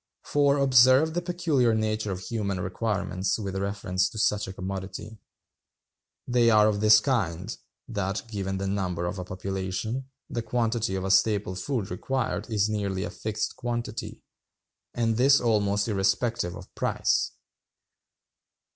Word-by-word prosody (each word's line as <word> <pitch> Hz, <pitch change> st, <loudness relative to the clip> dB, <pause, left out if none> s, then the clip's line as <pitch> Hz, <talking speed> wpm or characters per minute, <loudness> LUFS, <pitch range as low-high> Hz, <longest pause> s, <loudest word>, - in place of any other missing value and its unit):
For 145 Hz, -1 st, +2 dB
observe 130 Hz, +3 st, +5 dB
the 175 Hz, -, -1 dB
peculiar 160 Hz, -10 st, +1 dB
nature 110 Hz, -1 st, -1 dB
of 95 Hz, -1 st, -4 dB
human 100 Hz, -3 st, -2 dB
requirements 95 Hz, 0 st, -1 dB
with 100 Hz, -3 st, -4 dB
reference 95 Hz, -1 st, -1 dB
to -, -, -10 dB
such 105 Hz, -1 st, +1 dB
a 95 Hz, -, -6 dB
commodity. 95 Hz, +3 st, -6 dB, 1.1 s
They 120 Hz, -2 st, +4 dB
are 105 Hz, -1 st, +6 dB
of 105 Hz, -1 st, 0 dB
this 110 Hz, 0 st, +7 dB
kind, 105 Hz, -, -1 dB, 0.3 s
that, 100 Hz, -3 st, -2 dB
given 95 Hz, -3 st, -3 dB
the 100 Hz, -, -3 dB
number 95 Hz, -3 st, -1 dB
of 90 Hz, +2 st, -3 dB
a -, -, -3 dB
population, 95 Hz, +7 st, -4 dB, 0.2 s
the 120 Hz, -, -3 dB
quantity 115 Hz, -2 st, -1 dB
of 95 Hz, -, -2 dB
the 95 Hz, -, 0 dB
staple 100 Hz, -1 st, +3 dB
food 100 Hz, +2 st, -3 dB
required 105 Hz, 0 st, -2 dB
is 105 Hz, -2 st, +2 dB
nearly 100 Hz, -3 st, -2 dB
a -, -, -4 dB
fixed 110 Hz, 0 st, -3 dB
quantity, 120 Hz, -2 st, -4 dB, 0.7 s
and 115 Hz, -2 st, +1 dB
this 135 Hz, +3 st, +6 dB
almost 105 Hz, -3 st, +1 dB
irrespective 100 Hz, -1 st, 0 dB
of -, -, -12 dB
price. -, -, 0 dB
105 Hz, 140 wpm, -27 LUFS, 95-120 Hz, 1.1 s, this